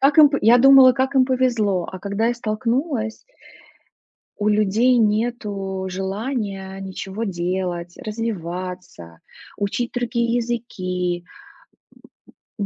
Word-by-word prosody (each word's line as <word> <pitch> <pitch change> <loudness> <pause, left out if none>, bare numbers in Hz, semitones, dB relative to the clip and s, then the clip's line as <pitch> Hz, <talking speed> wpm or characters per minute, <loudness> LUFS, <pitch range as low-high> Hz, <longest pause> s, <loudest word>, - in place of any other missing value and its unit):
Как 275 +3 +3
им 300 -2 +9
по 280 - 0
я 235 +3 +6
думала, 265 0 +8
как 265 +3 -1
им 260 - +5
повезло, 235 -8 0
а 185 - -6
когда 200 +3 -1
я 240 - +1
столкнулась. 230 +1 -2 1.2
У 210 - 0
людей 215 +4 +3
нету 210 -4 -1
желания 195 0 -4
ничего 195 +3 -5
делать, 175 -2 -3
развиваться, 180 - -6 0.4
учить 205 +4 -2
другие 235 -1 -1
языки, 185 -7 -3 1.4
м, 200 - -1
215 Hz, 110 wpm, -21 LUFS, 190-240 Hz, 1.4 s, им